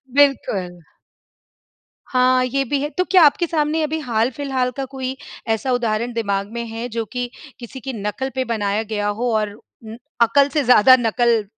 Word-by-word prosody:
बिल्कुल। 200 -11 +1 1.3
हाँ, 255 0 +3
ये 275 +2 0
भी 275 +2 -1
है। 295 - -2
तो 365 +3 -1
क्या 370 -2 +7
आपके 320 +4 +3
सामने 310 0 0
अभी 315 +1 -2
हाल 235 -4 0
फिलहाल 260 -2 -2
का 270 - -2
कोई 265 -1 -4 0.3
ऐसा 225 +4 0
उदाहरण 235 -1 -1
दिमाग 200 -2 -2
में 235 0 -3
है 225 +2 -5
जो 230 -1 -3
कि 245 -1 -2 0.3
किसी 245 +2 -9
की 265 +2 -6
नकल 215 +5 -3
पे 260 - 0
बनाया 205 0 -1
गया 210 -1 -3
हो 245 -1 0
और 210 -1 -1
उम, 220 +1 -13 0.3
अकल 275 +5 +4
से 295 -2 0
ज़्यादा 250 +1 +7
नकल 235 -1 +2
245 Hz, 175 wpm, -20 LUFS, 220-270 Hz, 1.3 s, क्या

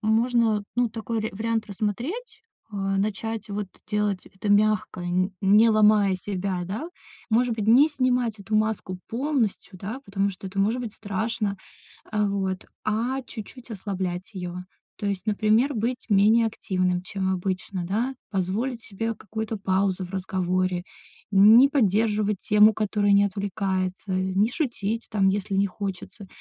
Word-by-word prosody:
можно, 225 -1 +2
ну, 245 -1 +3
такой 225 0 -3
ря 220 - -2
вариант 225 +1 -1
рассмотреть. 280 - -4 0.3
Э, - - -5
начать 200 +3 -2
вот 205 0 -3 0.2
делать 210 -3 -1
это 195 +2 -6
мягко, 215 -1 +2
нь 185 +2 +1
не 210 +4 +6
ломая 210 -2 +5
себя, 185 -1 -3
да. 215 - -4 0.4
Может 235 +1 +3
быть, 215 -2 -3
не 265 +6 +7
снимать 250 -6 0
эту 215 +2 -1
маску 215 -4 -1
полностью, 235 -7 -1
да, 215 +8 -5
потому 200 0 0
что 190 +1 -9
это 195 +1 -7
может 220 +6 +2
быть 225 -4 -5
страшно, 210 0 -2 0.6
э, 210 -1 +2
вот, 190 -2 -2 0.2
а 240 +5 0
чуть-чуть 240 +2 -10
ослаблять 190 -2 -4
её. 180 -1 -5 0.4
То - - -6
есть, 200 +1 -2
например, 215 +6 +2
быть 235 +3 -2
менее 215 +3 +5
активным, 185 -4 -1
чем 190 0 -2
обычно, 185 0 -3
да. 230 +8 -1 0.2
Позволить 215 +6 -1
себе 225 +3 -3
какую-то 220 +1 -5
паузу 190 -1 0
в - - -14
разговоре, 185 -1 -1 0.5
не 215 +7 +8
поддерживать 210 -4 +2
тему, 210 +1 +6
которая 205 -1 +1
не 200 0 +6
отвлекается, 190 -1 -2
не 190 +4 +1
шутить, 235 -6 -2
там, 195 -3 +3
если 200 +1 -1
не 200 +1 +3
хочется. 195 +1 -6
210 Hz, 145 wpm, -25 LUFS, 195-225 Hz, 0.6 s, не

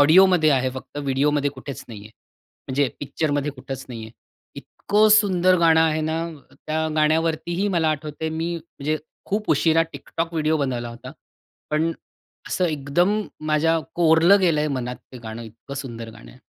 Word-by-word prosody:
ऑडिओमध्ये 170 +1 +6
आहे 130 0 0
फक्त 130 +2 -10
व्हिडिओमध्ये 145 +1 +1
कुठेच 140 -1 -8
नाही 110 -4 -9
आहे. 105 +2 -12 0.6
म्हणजे 135 +1 +1
पिक्चरमध्ये 145 0 -1
कुठंच 135 -1 -7
नाही 120 -3 -7
आहे. 110 - -9 0.4
इतकं 210 +1 +1
सुंदर 185 -4 +4
गाणं 165 -1 +5
आहे 155 -1 +2
ना, 160 +1 -1
अ, 155 -5 -13
त्या 160 +1 0
गाण्यावरतीही 160 +4 +1
मला 170 -4 +1
आठवते 155 +1 -4
मी 170 +1 -1
म्हणजे 155 -2 -4 0.3
खूप 210 +2 -1
उशिरा 160 +2 +4
TikTok 165 0 -4
व्हिडिओ 160 -1 +1
बनवला 125 -4 -2
होता. 115 0 -9 0.6
पण 155 +2 +1 0.6
असं 185 - 0
एकदम 165 +7 +1 0.3
माझ्या 160 +2 +2 0.2
कोरलं 170 +3 +5
गेलंय 155 -5 +2
मनात, 125 0 -4 0.2
ते 125 - -8
गाणं 110 0 -7
इतकं 115 +5 -10
सुंदर 115 -5 -6
गाणं - - -14
आहे. - - -17
155 Hz, 155 wpm, -23 LUFS, 135-165 Hz, 0.6 s, ऑडिओमध्ये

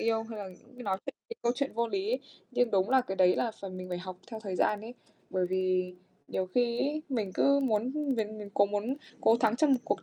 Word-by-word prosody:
yêu, 225 -1 +2
hay 225 -1 -7
là 200 -2 -5 0.3
cứ 250 - -8
nói 195 -3 0
chuyện - - -5 0.2
về 465 - -4
câu 240 - +3
chuyện 280 +1 -1
vô 235 +1 +1
lý. 400 - 0 0.3
Nhưng 245 -2 +2
đúng 195 +2 +2
là 265 - +6
cái 195 -6 -4
đấy 180 -1 +5
là 235 - +1
phải 195 -1 -5
mình 185 0 -7
phải 180 -1 -2
học 185 0 -7
theo 220 -1 -5
thời 195 -4 -4
gian 210 - +2
ấy, 230 +3 -8 0.4
bởi 185 -1 +1
vì 185 -1 +1 0.3
nhiều 185 - -1
khi 235 +4 +1
ấy, 300 +2 0
mình 225 -8 -1
cứ 280 0 +4
muốn 240 +1 +1 0.2
biến 215 -1 -2
biến 205 -1 -7
cố 200 - +5
muốn 205 +5 -1 0.3
cố 225 - +5
thắng 225 0 +2
trong 300 0 +4
một 255 - +3
cuộc - - -1
220 Hz, 250 wpm, -31 LUFS, 190-245 Hz, 0.4 s, là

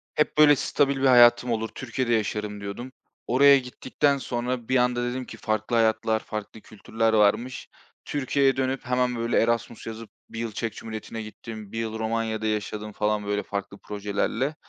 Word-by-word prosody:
Hep 150 - +1
böyle 150 -1 +7
stabil 140 0 +1
bir - - +2
hayatım 120 -1 +6
olur, 115 -1 -1
Türkiye'de 125 -1 -2
yaşarım 105 -1 -2
diyordum. 100 +6 -6 0.4
Oraya 140 +3 +6
gittikten 130 +3 -1
sonra 125 -2 -3
bir 130 - +3
anda 125 0 +1
dedim 130 0 -4
ki 115 - -10
farklı 110 +2 -1
hayatlar, 110 -1 +2
farklı 110 0 -7
kültürler 110 +2 -2
varmış. 110 +4 +1 0.4
Türkiye'ye 140 -1 +1
dönüp 135 +1 -1
hemen 125 0 +1
böyle 115 +1 +1
Erasmus 115 0 -1
yazıp 115 -1 -7 0.2
1 115 - -7
yıl 115 -1 -3
Çek 115 +2 -3
Cumhuriyeti'ne 110 0 -7
gittim, 110 -1 -9
1 - - -6
yıl 110 -1 -3
Romanya'da 110 -1 -2
yaşadım 105 0 -3
falan 105 0 -1
böyle 105 0 -1
farklı 100 0 -5
projelerle. 105 +9 -2
115 Hz, 165 wpm, -25 LUFS, 110-125 Hz, 0.4 s, böyle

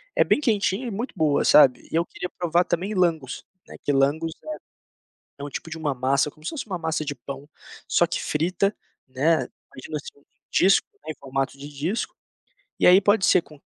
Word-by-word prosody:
é - - +5
bem - - +2
quentinha 220 -3 0
e - - -4
muito 230 +6 -4
boa, 150 -3 +2
sabe. 130 -4 +5
E - - -3
eu 170 - +2
queria 180 - -6
provar 175 0 +2
também 180 +5 -2
Lángos, 165 -8 0 0.2
né, - - -11
que - - +1
Lángos 145 +4 +1
é 310 0 -6 0.8
é - - -4
um 145 - -6
tipo 165 - -6
de 160 - -6
uma 150 -3 -1
massa, 135 +3 +1
como 155 +1 -22
se - - -2
fosse 305 - -5
uma 190 -4 -4
massa 160 -1 -2
de 145 -1 -3
pão, 140 +3 -9 0.4
só 175 - +3
que 170 - -3
frita, 180 +6 0 0.3
né. 140 +6 +2 0.4
Imagina, 150 +4 -7
assim, 145 -1 -8
um 140 - -27 0.3
disco, 195 +1 +4 0.2
né, 155 - -4
em - - -18
formato 135 0 -3
de 145 +1 -8
disco, 155 +10 -3 0.7
e - - +2
aí 180 +2 +8
pode 205 0 +3
ser 180 - +5
com 150 -3 -17
160 Hz, 210 wpm, -24 LUFS, 140-185 Hz, 0.8 s, aí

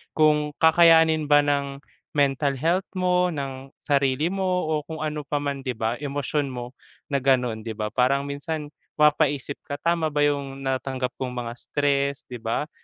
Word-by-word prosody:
Kung 150 -1 +3
kakayanin 160 -1 +5
ba 145 0 +5
ng 140 -1 -1 0.3
mental 140 0 +2
health 170 +7 0
mo, 180 0 +2
ng 135 -2 -6
sarili 140 +2 +1
mo, 195 -1 -2 0.2
o 160 - +1
kung 160 -1 -6
ano 150 -1 -3
pa 145 0 -1
man, 140 -1 -2
'di 125 - -1
ba? 115 +1 -1
Emosyon 145 0 -2
mo, 125 -2 -6 0.4
na 140 - +2
gano'n, 125 -4 +1
'di 110 - -3
ba? 105 0 -3
Parang 130 +2 +2
minsan, 145 +2 -4 0.3
mapapaisip 150 -2 +2
ka, 145 - -3
tama 170 -1 +1
ba 150 - +1
yung 140 -2 -1
natanggap 130 -1 -2
kong 125 -1 -3
mga 120 -1 -4
stress, 140 -1 0
'di 125 - -6
ba? 115 +7 -2
140 Hz, 170 wpm, -24 LUFS, 135-150 Hz, 0.4 s, kakayanin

